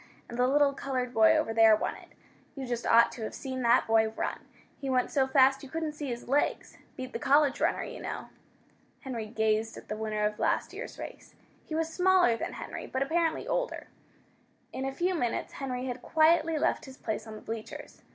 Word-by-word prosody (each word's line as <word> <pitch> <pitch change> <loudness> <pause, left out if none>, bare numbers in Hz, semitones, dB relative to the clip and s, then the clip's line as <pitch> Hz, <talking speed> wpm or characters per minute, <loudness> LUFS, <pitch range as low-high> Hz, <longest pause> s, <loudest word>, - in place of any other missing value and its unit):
And 235 - -7
the 250 - +4
little 285 +1 +4
colored 255 -2 -3
boy 220 -1 +6
over 225 - 0
there 225 -1 +7
won - - -2
it. - - -14 0.5
You 270 -2 -5
just 240 -1 -3
ought 235 0 +6
to 235 - -9
have 220 - -4
seen 260 -2 -5
that 240 +1 +4
boy 220 0 +3
run! 220 - -3 0.4
He 275 - -4
went 255 -1 +1
so 270 -2 +2
fast 270 0 +4
you 275 - -10
couldn't 320 0 -3
see 295 -1 -6
his 240 -1 -5
legs. 280 +4 0 0.2
Beat 255 0 -6
the 230 - -3
college 285 +2 +3
runner, - - +1
you - - -8
know." - - -5 0.7
Henry 235 -5 -5
gazed 220 0 0
at - - -12
the 215 - -2
winner 215 -1 -1
of 210 0 -2
last - - 0
year's - - -7
race. - - -9 0.3
He 310 - -5
was 325 0 -1
smaller 365 -8 +4
than - - -4
Henry, - - -7
but 260 +1 -1
apparently 325 - 0
older. - - -2 0.8
In 265 - -3
a 270 - -1
few 350 +7 0
minutes 245 -9 -2
Henry 255 -2 -4
had 250 -1 -4
quietly 320 +2 +3
left - - 0
his 265 -1 -12
place 220 0 -4
on 220 - -8
the - - -10
bleachers. 225 -1 -8
260 Hz, 210 wpm, -29 LUFS, 225-290 Hz, 0.8 s, there